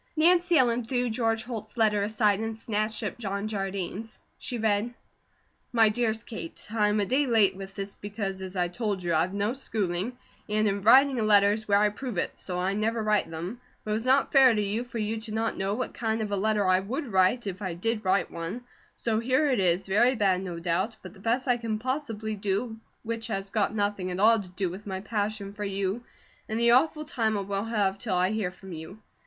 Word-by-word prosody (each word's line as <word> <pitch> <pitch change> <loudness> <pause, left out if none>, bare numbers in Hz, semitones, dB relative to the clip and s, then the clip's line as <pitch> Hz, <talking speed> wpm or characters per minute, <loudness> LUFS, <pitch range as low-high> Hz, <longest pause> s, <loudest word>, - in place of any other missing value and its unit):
Nancy 345 +1 +5
Ellen 245 -2 +3
threw 245 0 -1
George 225 -1 0
Holt's 220 -2 -7
letter 215 -2 +3
aside 210 -1 +2
and 225 0 -3
snatched 215 -1 -2
up - - -4
John 200 -1 -3
Jardine's. 195 +1 -4 0.2
She 250 -2 -4
read: 220 +2 0 0.8
MY 225 -2 +5
DEREST 225 0 -1
KATE: 170 -8 -6
I 215 -2 +2
am 210 +1 +1
a 205 - +2
day 270 +6 +2
late 220 -6 +4
with 195 0 -9
this 200 0 -5
becos 200 -2 -5
as 190 0 -6
I 180 -1 +1
told 200 0 -3
you 170 -1 0
I 160 - +4
have 180 +3 -1
no 205 +3 0
schooling 215 -3 -2 0.3
and 215 +1 +2
in 200 0 0
writing 260 +5 +6
a - - +1
letter 205 -1 +5
is 215 0 -5
where 200 -1 +4
I 210 +1 +4
prove 225 0 -6
it, - - -1
so 180 -1 -4
I 185 +2 0
never 220 +2 0
write 210 -5 +1
them, 175 +9 -6 0.2
but 215 - -4
it - - +2
was 225 +3 -2
not 265 +1 +4
fare 265 -4 +7
to - - 0
you 210 +4 -1
for 245 -1 -8
you 220 0 -2
not 225 +1 0
to - - -12
know 195 +2 0
what 255 - -3
kind 225 -1 -1
of 210 - -4
a - - +1
letter 210 +1 +1
I 185 0 +4
would 250 +7 -4
write 190 +6 +3
if 195 0 -5
I 185 -4 -3
did 220 +5 -1
write 190 0 +1
one, 170 +9 -5 0.3
so 220 -2 0
here 260 +5 +2
it 250 - +1
is 180 0 +2
very 240 +7 +3
bad 195 -4 +2
no 180 -3 -5
dout 185 +6 -1
but - - -9
the 200 - -16
best 235 +6 0
I 245 -1 +3
can 225 -2 -2
possably 225 -3 -3
do 210 +3 -2 0.3
which 230 0 -4
has 195 -3 -4
got 215 -1 0
nothing 205 -3 -1
at 180 +1 -4
all 225 +1 +5
to 185 - -11
do 185 +1 -2
with 190 +5 -8
my 190 -1 -3
pashion 205 -1 -3
for 210 0 -6
you 200 +3 -2 0.5
and 220 +1 -1
the 235 0 +4
aughful 305 +5 +3
time 225 -7 0
I - - -1
will 200 +1 -2
have 200 -4 0
till 210 -5 -2
I 180 +2 +2
here 215 -4 -1
from 190 +1 -12
you. 160 +5 -8
215 Hz, 230 wpm, -27 LUFS, 195-230 Hz, 0.8 s, fare